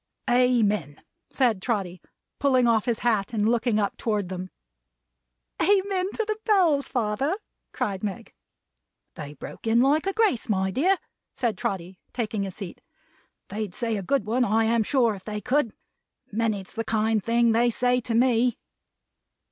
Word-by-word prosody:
"Amen!" 220 - +2 0.3
said 235 -8 +1
Trotty, 190 -7 -2 0.4
pulling 260 -3 +3
off 225 -3 +3
his 235 -2 0
hat 220 -2 +1
and 215 -1 +1
looking 235 -1 +2
up 205 -2 -1
toward 210 -5 -1
them. 185 0 -5 1.1
"Amen 390 -1 +2
to 445 - -1
the 430 0 -2
Bells, 345 -10 +3
father?" 245 - 0 0.4
cried 205 -6 -3
Meg. 200 -3 -5 0.8
"They 145 0 -8
broke - - -9
in 225 +1 +4
like 295 +7 +3
a 390 - 0
grace, 420 - +1
my 190 -2 +1
dear," 355 - +2 0.4
said 235 -4 0
Trotty, 185 0 -4
taking 220 -4 -2
his 195 -2 -4
seat. 195 -5 -8 0.7
"They'd 210 -2 -4
say 230 -2 -1
a 200 - -2
good 250 +3 0
one, 240 +4 +1
I 225 0 +2
am 230 +1 +2
sure, 235 -1 +2
if 190 -2 -10
they 210 -1 -4
could. 250 +2 +1 0.6
Many's 215 -3 -1
the 225 - -3
kind 220 -1 +1
thing 235 0 +3
they 235 +2 +3
say 250 +1 +1
to 230 -1 -2
me." 245 -1 +3
230 Hz, 155 wpm, -25 LUFS, 205-250 Hz, 1.1 s, in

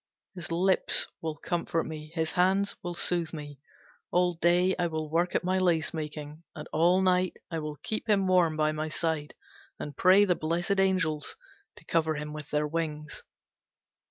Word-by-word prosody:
His 175 -4 -7
lips 185 +3 +2 0.2
will 160 -1 -3
comfort 165 0 -1
me, 155 -1 -7
his 160 -1 0
hands 190 +2 +2
will 175 -1 -5
soothe 170 -2 -1
me. 145 -3 -8 0.5
All 180 0 +2
day 175 +2 +3
I 175 - +2
will 155 -2 -4
work 170 +2 +1
at - - +1
my 185 +1 +1
lace 175 -4 +1
making, 150 -1 -6
and 150 - -7
all 175 +4 +4
night 185 -1 +2
I 165 - -2
will 150 -1 -5
keep 220 +1 -3
him 200 -2 +3
warm 180 -4 +3
by 155 0 +2
my 155 0 -3
side 160 -2 -2 0.4
and 145 -2 -6
pray 190 +5 +6
the 185 - +3
blessed 175 +4 -1
Angels 185 -6 +1 0.4
to - - -16
cover 160 -1 +1
him 150 0 -5
with 150 -1 -8
their 150 0 +1
wings. 150 -1 -4
165 Hz, 175 wpm, -29 LUFS, 155-180 Hz, 0.5 s, pray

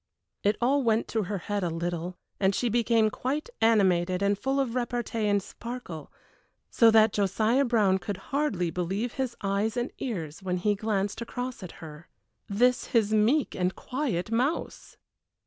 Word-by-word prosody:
It 205 +1 +2
all 270 +4 +3
went 225 -2 +1
to 220 -3 -1
her 200 +2 -3
head 205 +2 -3
a 175 - 0
little, 175 +1 -3 0.2
and 195 0 +2
she 245 - 0
became 225 -1 +3
quite 290 - -3
animated 185 -4 +3
and 200 0 +3
full 270 +6 -1
of 260 -4 0
repartee 240 -3 -1
and 205 -1 +2
sparkle, 230 - -8 0.6
so 230 - +6
that 220 0 +5
Josiah 215 +7 +2
Brown 210 -6 +3
could 185 +2 -4 0.2
hardly 205 - 0
believe 195 +8 -2
his 255 -3 -3
eyes 200 +4 0
and 240 +2 -1
ears 170 - -4
when 180 -1 -1
he 205 +4 +1
glanced 205 0 -2
across 245 +1 -5
at 185 - -8
her. 155 +2 -11 0.4
This 245 +5 +2
his 220 -3 +1
meek 235 +7 +3
and 180 0 -1
quiet 245 - -3
mouse! 255 +8 -2
215 Hz, 165 wpm, -28 LUFS, 190-240 Hz, 0.6 s, so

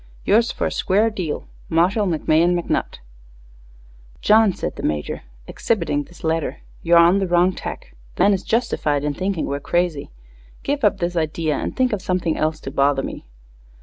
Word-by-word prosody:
Yours 230 +3 +3
fer - - -3
a - - -1
square 210 +4 +1
deal 180 -8 -4 0.2
Marshall 185 +6 +2
McMahon 170 +1 +2
McNutt_. 170 - -2 1.2
"John," 215 -1 +5
said - - -5
the - - -7
Major, 75 -1 -2 0.2
exhibiting 150 - -1
this 175 - -17
letter, 160 -1 -1 0.2
"you're 170 0 +4
on 170 +3 +6
the 195 - -1
wrong 175 +1 +3
tack. - - -8 0.2
The - - +2
man 200 +1 +5
is 190 - -1
justified 155 - 0
in 150 0 -1
thinking 185 +2 -2
we're 140 0 -3
crazy. 175 -1 -1 0.5
Give 285 0 -2
up 205 -2 +3
this 175 -1 -2
idea 155 -1 -1
and - - -4
think 255 -3 +2
of 205 - -2
something 180 -4 -1
else 155 0 -1
to 135 - -6
bother 140 -1 +2
me." - - -7
175 Hz, 175 wpm, -21 LUFS, 155-200 Hz, 1.2 s, on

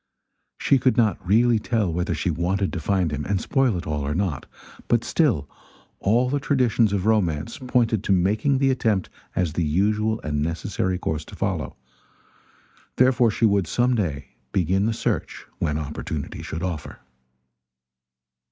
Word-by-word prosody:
She 135 - +3
could 130 +1 +2
not 110 -6 +2
really 115 +5 +3
tell 105 -6 0
whether 90 +4 -1
she 90 - -1
wanted 90 +4 -1
to 90 - -2
find 90 0 0
him 75 +1 -3
and 100 +2 0
spoil 130 -5 +1
it 85 - -6
all 75 -1 -2
or 70 +1 -2
not; 90 -7 -2 0.4
but 120 -1 +2
still 110 - +1 0.5
all 120 +6 +2
the 140 +3 0
traditions 125 -6 +2
of 100 -2 -1
romance 95 -4 0
pointed 120 -5 +1
to - - 0
the 95 - +5
making 105 +9 +2
the 135 0 +3
attempt 110 -7 0 0.2
as 90 -5 0
the 85 - 0
usual 105 +7 +1
and 75 -1 -2
necessary 90 +3 -1
course 80 -3 -3
to - - -11
follow; 95 -7 -2 1.2
therefore 125 -2 +4
she 110 +2 +1
would 100 -5 +2
some 125 +7 +2
day 75 - -2 0.2
begin 95 +3 +1
the 115 - 0
search - - -3
when 75 -2 0
opportunity 75 -1 -5
should 80 +2 -5
offer. 85 -5 -4
100 Hz, 160 wpm, -24 LUFS, 85-115 Hz, 1.2 s, the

